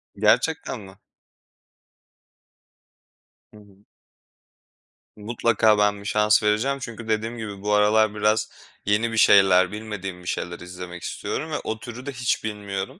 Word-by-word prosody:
Gerçekten 120 +5 +1
mi? 95 -1 -13 2.6
Hı - - -14
hı. 100 -1 -20 1.3
Mutlaka 110 0 +2
ben 105 -1 +2
bir - - -13
şans 105 0 +3
vereceğim 110 +7 +1
çünkü 115 -2 -7
dediğim 110 +2 -1
gibi 105 -3 -7
bu 105 +1 -2
aralar 105 +1 +3
biraz 110 +1 +1 0.4
yeni 105 +3 +1
bir 115 - -4
şeyler, 95 -3 +6
bilmediğim 105 -4 -6
bir - - -12
şeyler 85 -1 -3
izlemek 90 0 -9
istiyorum 155 +2 -4
ve - - -1
o 110 0 -4
türü 120 +3 -9
de 140 - -4
hiç 125 -2 -1
bilmiyorum. 100 -3 -5
105 Hz, 135 wpm, -24 LUFS, 100-110 Hz, 2.6 s, şeyler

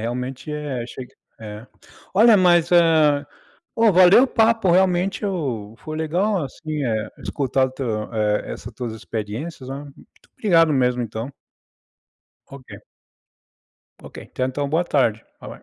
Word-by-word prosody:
realmente 125 +4 -5
é 145 -5 -4
achei 125 +1 -8
que - - -27 0.3
é. 105 +2 -9 0.5
Olha, 220 +2 +6
mas 175 -3 +3
eh, 160 -4 +4 0.5
ó, 225 -2 +4
valeu 185 +7 +7
o - - +1
papo, 225 -5 +2
realmente, 185 +2 +1
eu 130 - -3
foi 155 +3 -7
legal, 175 +3 0
assim, 150 +2 -5
eh, 110 -3 -2
escutar 135 -1 0
o - - -10
teu 115 -5 -4
eh, 105 -1 -1
essas 120 0 -9
tuas 120 -2 -5
experiências, 115 +7 -6
né. 135 - -4
Muito 140 -1 -16 0.3
obrigado 165 -7 +3
mesmo, 125 -2 +1
então. 115 +3 -5 1.2
Ok. 135 -1 -13 1.4
Ok, - - -12
tenha 130 - -1
então 145 +2 -3
uma 140 - -4
boa 170 +3 +1
tarde, 115 -9 0 0.2
bye, - - -9
bye. - - -14
140 Hz, 150 wpm, -21 LUFS, 120-175 Hz, 1.4 s, valeu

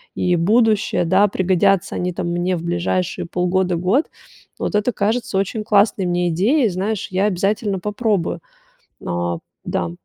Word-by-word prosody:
и 180 -1 +1
будущее. 215 +2 +2
Да, 190 +4 +4
пригодятся 190 0 +1
они 180 0 -2
там 175 0 -3
мне 175 +1 0
в 170 - -5
ближайшие 175 +1 -1
полгода, 180 +1 0
год. 190 - +1 0.5
Вот - - -3
это 210 +4 +1
кажется 220 +1 -1
очень 200 +3 -1
классной 205 -2 +3
мне 175 0 0
идеей. 220 - +2
Знаешь, 195 +3 -2
я 190 +2 +1
обязательно 200 +1 0
попробую. 210 -2 -1 0.7
А, 85 -1 -2 0.3
да. 85 -1 -2
190 Hz, 145 wpm, -20 LUFS, 175-210 Hz, 0.7 s, Да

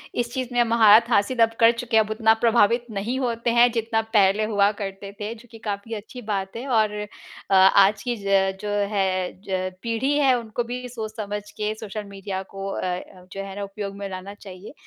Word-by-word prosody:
इस 240 -1 -1
चीज़ 255 -2 -3
में 245 0 +4
महारथ 230 -1 +5
हासिल 235 +2 +1
अब 225 0 +1
कर 230 0 +7
चुके 235 -1 -1
हैं 220 - +6
अब 210 - -11
उतना 220 0 +4
प्रभावित 235 0 +3
नहीं 215 +5 -3
होते 235 -2 -1
हैं 240 +1 +5
जितना 225 -1 0
पहले 200 +1 +4
हुआ 205 -1 +2
करते 195 0 -6
थे, 210 +2 -4
जो 235 +2 -16
कि 225 - -11
काफ़ी 210 +1 -5
अच्छी 220 +4 -9
बात 195 -3 -3
है। 235 +3 -5
और 220 -5 +2 0.7
आज 195 +2 +5
की 245 -1 -1
ज 195 -1 +2
जो 210 - -4 0.2
है 185 -2 0 0.2
ज 185 -1 -2
पीढ़ी 230 +4 -1
है 275 -3 +4
उनको 230 +1 -4
भी 250 +1 -6
सोच-समझ 215 -3 -5 0.2
के 210 0 -1
सोशल 215 0 -6
मीडिया 195 -1 -6
को 195 0 -5
अ, - - -4 0.5
जो 195 - -5
है 195 -1 -8
ना 205 - -4
उपयोग 200 0 -6
में 200 0 -5
लाना 190 +1 -7
चाहिए। 195 +1 -11
215 Hz, 200 wpm, -23 LUFS, 195-235 Hz, 0.7 s, कर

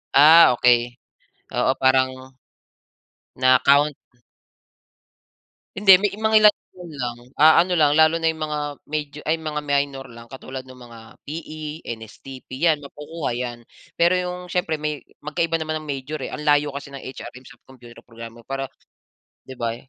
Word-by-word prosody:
Ah, 155 -1 +8
okey. 120 0 +2 0.6
Oo - - +1
parang, 130 0 +2 1.2
na 130 0 +4
count? 145 +1 +4 1.8
Hindi, 195 0 +5
may 205 -1 0
mangilan-ilan 215 -4 +2
lang, 120 -3 -4 0.2
ah, 155 +1 +6
ano 180 +1 +2
lang, 150 -3 +4
lalo 160 +1 +5
na 165 - +1
'yung 160 - -12
mga 150 -1 -4 0.3
major 150 -1 -5
ay, 160 - +2
mga 150 -1 -4
minor 140 -1 -1
lang, 115 0 -13
katulad 130 0 -8
ng 130 0 -15
mga 120 -2 -13 0.3
PE, 155 0 -7
NSTP 115 +3 -10
yan, 160 +2 +2
makukuha 150 +1 -6
'yan. 120 -1 -5 0.4
Pero 170 +2 +4
yung 180 0 -3
siyempre, 175 -3 -2
may 150 -1 -4 0.2
magkaiba 165 +2 -1
naman 155 0 -3
ang 155 - -12
major, 140 +2 -5
eh. - - -6
Ang 150 - -7
layo 145 0 +3
kasi 140 0 -9
ng 135 - -8
HRM 130 -1 -10
sa 125 -3 -16
computer 120 -3 -15
programmer, 115 0 -12
para 135 0 -4 0.7
'di 130 - -11
ba, 115 -1 -2
eh. 125 +2 -16
145 Hz, 155 wpm, -22 LUFS, 130-155 Hz, 1.8 s, Ah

